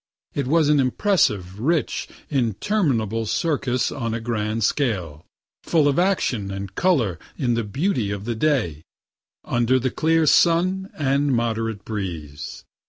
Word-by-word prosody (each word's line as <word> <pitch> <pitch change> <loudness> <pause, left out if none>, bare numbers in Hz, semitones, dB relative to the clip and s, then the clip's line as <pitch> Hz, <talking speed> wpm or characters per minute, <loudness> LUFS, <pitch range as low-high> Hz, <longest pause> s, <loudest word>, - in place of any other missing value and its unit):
It 140 -3 -2
was 160 +1 +3
an 150 -1 +4
impressive, 125 - +1
rich, 155 +6 0 0.2
interminable 115 - 0
circus 135 -4 0
on 115 -5 -3
a - - -2
grand 110 -1 -2
scale, 90 - -1 0.3
full 155 -4 +2
of 145 +3 +2
action 155 - +1
and 100 0 -6
color 120 - +1 0.2
in 125 -6 +1
the 115 0 0
beauty 125 - -1
of 100 0 -4
the 120 - -1
day, 110 - 0 0.6
under 120 +2 +2
the 130 0 -1
clear 160 0 +2
sun 185 +5 +3
and 140 0 +1
moderate 115 -2 -2
breeze. 85 -9 -6
120 Hz, 135 wpm, -23 LUFS, 105-150 Hz, 0.6 s, an